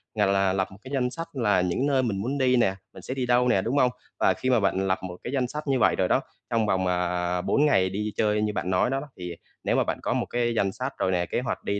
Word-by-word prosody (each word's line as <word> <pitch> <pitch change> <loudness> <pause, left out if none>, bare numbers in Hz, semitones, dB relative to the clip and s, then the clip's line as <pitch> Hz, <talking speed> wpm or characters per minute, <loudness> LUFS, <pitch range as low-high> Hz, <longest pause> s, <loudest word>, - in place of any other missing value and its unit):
à, 105 -1 +3
là 95 -1 +2
lập 95 -1 0
một 95 - -12
cái 130 - -11
danh 125 -2 +1
sách 165 +5 -6
là 105 -8 +2
những 90 +10 0
nơi 135 -2 +2
mình 110 -5 -1
muốn 130 +7 -2
đi 130 -2 +3
nè, 100 -6 +2 0.2
mình - - -11
sẽ - - -5
đi 130 -1 -2
đâu 125 0 +3
nè, 110 -6 +3
đúng 120 +8 -1
hông? 125 -3 +4 0.3
Và - - +4
khi 130 - -2
mà 125 -2 +4
bạn 95 -1 +1
lập 95 - +1
một 90 -1 -6
cái 125 - -5
danh 130 -3 +1
sách 150 +4 -5
như 135 -2 +2
vậy - - +4
rồi - - +1
đó, - - +2 0.3
trong 115 -2 +1
vòng, 95 -2 +1
à, 90 0 0
4 145 +10 +2
ngày 95 -11 +3
đi 105 +3 -3
chơi 105 -1 +1
như 105 0 0
bạn 90 -2 -2
nói 95 +5 +2
đó 135 +1 0
đó, 145 - -8
thì 90 -1 -6 0.3
nếu - - +1
mà - - +3
bạn - - -3
có - - -1
một - - 0
cái 120 -1 -1
danh 100 -3 +1
sách 130 +6 -4
rồi 95 - 0
nè, 90 -1 +1
kế - - -2
hoạch 130 - -4
đi 100 0 -1
105 Hz, 305 wpm, -26 LUFS, 95-130 Hz, 0.3 s, hông